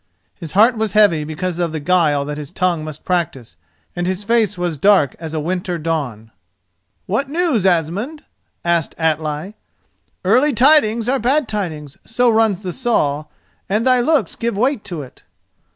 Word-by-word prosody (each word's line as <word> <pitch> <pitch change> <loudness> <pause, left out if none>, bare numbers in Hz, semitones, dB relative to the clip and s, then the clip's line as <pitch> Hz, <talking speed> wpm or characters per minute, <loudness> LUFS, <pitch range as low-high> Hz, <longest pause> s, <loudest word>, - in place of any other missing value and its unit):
His 160 -3 -9
heart 225 +5 +5
was 220 -2 -2
heavy 205 -8 +4
because 170 +3 -4
of 170 -2 0
the 160 - -2
guile 150 -3 +2
that 150 +1 -5
his 145 -2 -7
tongue 175 -4 -1
must 155 -1 -9
practise, 145 - -2 0.4
and 175 0 -2
his 185 +2 -2
face 225 -3 +1
was 175 -2 -2
dark 190 -7 +4
as 160 -1 -6
a - - 0
winter 180 +2 -2
dawn. 140 -9 -3 0.7
"What 230 +8 -1
news, 300 - +1
Asmund?" 190 - -1 0.4
asked 170 -2 0
Atli. 160 +3 -1 0.7
"Early 255 +9 +3
tidings 235 -3 +4
are 265 +2 +1
bad 265 +4 +1
tidings, 160 -10 -4
so 240 +1 +2
runs 220 -4 +2
the 180 -2 -4
saw, 155 - 0 0.4
and 210 +4 0
thy 255 -1 +4
looks 265 - +1
give 230 -3 -2
weight 255 +1 +1
to 170 -6 -5
it." 130 - -15
185 Hz, 165 wpm, -18 LUFS, 155-230 Hz, 0.7 s, heart